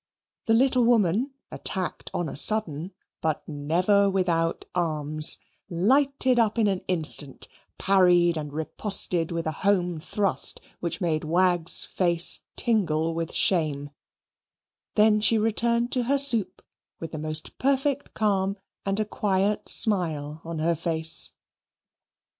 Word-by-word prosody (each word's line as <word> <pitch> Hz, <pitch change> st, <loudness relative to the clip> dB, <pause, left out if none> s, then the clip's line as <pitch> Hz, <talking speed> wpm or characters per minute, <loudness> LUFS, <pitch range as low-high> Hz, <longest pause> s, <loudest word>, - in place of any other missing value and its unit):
The 225 Hz, -, +3 dB
little 255 Hz, +1 st, +2 dB
woman, 230 Hz, -, +1 dB, 0.2 s
attacked 185 Hz, -2 st, -5 dB
on 175 Hz, -, -3 dB
a -, -, -7 dB
sudden, 175 Hz, -1 st, +2 dB, 0.3 s
but 155 Hz, -2 st, -3 dB
never 175 Hz, +7 st, +1 dB
without 170 Hz, -3 st, -1 dB
arms, 155 Hz, -3 st, +1 dB, 0.3 s
lighted 260 Hz, +7 st, +1 dB
up 220 Hz, -1 st, +1 dB
in 225 Hz, -, +2 dB
an 195 Hz, -3 st, -1 dB
instant, 155 Hz, -5 st, 0 dB, 0.3 s
parried 180 Hz, -3 st, +3 dB
and 150 Hz, -2 st, -6 dB
riposted 165 Hz, +2 st, +1 dB
with 165 Hz, -1 st, -4 dB
a 160 Hz, -, -1 dB
home 180 Hz, -4 st, 0 dB
thrust, 195 Hz, +4 st, 0 dB, 0.2 s
which 175 Hz, +3 st, -5 dB
made 160 Hz, -3 st, -1 dB
Wagg's 175 Hz, +1 st, +3 dB
face 175 Hz, -2 st, +2 dB, 0.2 s
tingle 165 Hz, -9 st, 0 dB
with 165 Hz, 0 st, -4 dB
shame; 150 Hz, -6 st, 0 dB, 1.0 s
then 215 Hz, 0 st, +4 dB
she 225 Hz, +1 st, +3 dB
returned 235 Hz, +2 st, 0 dB
to 250 Hz, -2 st, -1 dB
her 280 Hz, +3 st, +1 dB
soup 230 Hz, -9 st, +1 dB, 0.4 s
with 165 Hz, -, -7 dB
the 155 Hz, -, -6 dB
most 155 Hz, 0 st, -4 dB
perfect 275 Hz, +1 st, -1 dB
calm 200 Hz, -2 st, -1 dB, 0.3 s
and 195 Hz, +1 st, -1 dB
a 215 Hz, -, 0 dB
quiet 205 Hz, 0 st, -1 dB
smile 160 Hz, -7 st, +2 dB
on 165 Hz, 0 st, -7 dB
her 165 Hz, +2 st, 0 dB
face. 160 Hz, 0 st, 0 dB
180 Hz, 130 wpm, -25 LUFS, 160-215 Hz, 1.0 s, then